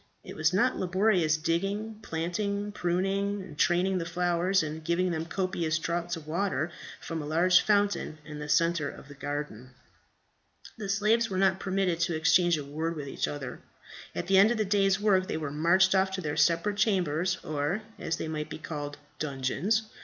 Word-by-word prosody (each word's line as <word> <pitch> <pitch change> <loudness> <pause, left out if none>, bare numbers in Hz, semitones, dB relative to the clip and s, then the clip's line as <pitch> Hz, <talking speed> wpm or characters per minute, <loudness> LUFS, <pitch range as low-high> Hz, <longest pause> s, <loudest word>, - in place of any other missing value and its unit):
It - - -9
was 155 +1 +2
not 235 +8 +2
laborious 185 -4 +2
digging, 195 +7 -2
planting, 200 +4 -2
pruning 195 +2 -1
and 160 -5 -11
training 180 +4 +2
the 165 - -3
flowers, 175 +1 +1
and 155 +1 -5
giving 175 +3 +1
them 165 0 -3
copious 175 -4 -1
draughts 170 +1 -2
of 160 -2 -10
water 165 -1 -1 0.3
from 165 -1 -5
a 145 - -6
large 180 +4 +4
fountain 205 -6 +1
in 150 -1 -8
the 150 0 -6
centre 165 -1 +2
of - - -12
the - - -9
garden. 140 -4 -6 1.0
The 200 -2 -5
slaves 215 +3 +2
were 190 - -3
not 190 0 +3
permitted 190 -3 0
to 170 -1 0
exchange 170 +2 +4
a 150 - -4
word 160 +4 -3
with 145 -2 -6
each - - -2
other. 145 -3 -6 0.6
At - - -2
the 190 +1 +5
end 200 +3 +7
of 240 - 0
the 215 - +1
day's 195 -1 +2
work 190 -3 +3
they - - -2
were 150 -3 -4
marched 170 +6 +4
off 190 0 +3
to 160 -6 -3
separate 175 +5 +2
chambers, 180 -4 +1
or, 155 +8 -2 0.2
as 165 - -1
they - - -4
might 155 -1 -4
be - - -6
called, 145 -2 -6 0.2
dungeons. 150 - 0
175 Hz, 185 wpm, -29 LUFS, 155-195 Hz, 1.0 s, end